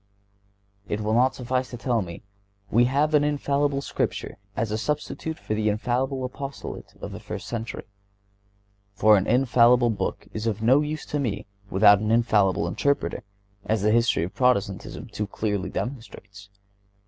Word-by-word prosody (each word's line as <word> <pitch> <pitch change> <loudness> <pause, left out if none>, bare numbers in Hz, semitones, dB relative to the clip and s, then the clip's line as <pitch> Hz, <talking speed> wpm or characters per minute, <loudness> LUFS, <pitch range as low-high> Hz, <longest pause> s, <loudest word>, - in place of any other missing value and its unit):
It 105 - -2
will 105 +1 0
not 130 +3 +3
suffice 130 +1 -2
to 120 - -7
tell 120 -1 0
me: 85 0 -8 0.5
"We 120 +3 +5
have 145 +5 +1
an 150 -1 +5
infallible 145 -1 0
Scripture - - -3 0.2
as 110 -1 -1
a 110 - 0
substitute 150 +4 -3
for - - -4
an 110 - -1
infallible 125 +5 0
apostolate 135 +2 -7
of - - -6
the - - -7
first - - -7
century," 115 -1 -5 1.1
for 105 0 +6
an 95 - +1
infallible 120 -1 +4
book 105 - -3
is 110 +1 -3
of 110 -2 -1
no 130 +5 +5
use 150 +1 -4
to 150 - -2
me 115 -8 -2 0.2
without 100 +1 +6
an 105 +1 -2
infallible 105 -7 +3
interpreter, 140 +11 0 0.4
as 110 -2 0
the 105 - +3
history 115 -6 +3
of 90 - -5
Protestantism 100 -7 0
too 105 - -4
clearly 100 -2 -2
demonstrates. 100 -5 -7
115 Hz, 160 wpm, -25 LUFS, 105-130 Hz, 1.1 s, for